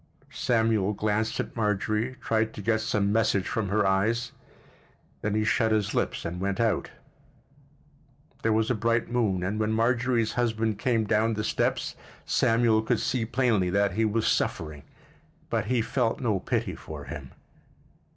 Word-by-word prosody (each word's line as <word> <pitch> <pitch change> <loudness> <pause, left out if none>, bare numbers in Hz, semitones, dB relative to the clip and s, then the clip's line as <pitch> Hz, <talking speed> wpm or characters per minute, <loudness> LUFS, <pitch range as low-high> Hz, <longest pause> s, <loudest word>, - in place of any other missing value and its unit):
Samuel 110 -4 +1
glanced 110 +2 -1
at - - -4
Marjorie, 110 +3 0
tried 110 0 0
to - - -6
get 110 +1 +1
some 105 -2 0
message 105 -3 +2
from 110 -3 -2
her 105 +1 +2
eyes; 110 +5 +1 0.9
then 105 0 -1
he 110 - +2
shut 110 +1 +2
his 105 -2 +1
lips - - -1
and 90 +2 -4
went 100 0 -1
out. 115 -1 +1 1.5
There 110 - +1
was 110 +2 +2
a - - +3
bright 115 +1 0
moon 105 -7 +1
and 100 +4 -2
when 110 0 +1
Marjorie's 120 0 +1
husband 110 -3 0
came 115 -2 +1
down 110 +1 +1
the 105 - -2
steps - - -1 0.3
Samuel 115 -1 +3
could 115 +1 0
see 125 -3 0
plainly 115 -6 +1
that 100 +1 +2
he 110 +5 0
was 110 +1 +1
suffering—but 80 - -3
he 125 -2 +1
felt 115 -1 0
no 110 -7 0
pity - - -1
for 75 -2 -8
him. - - -8
110 Hz, 155 wpm, -27 LUFS, 105-115 Hz, 1.5 s, a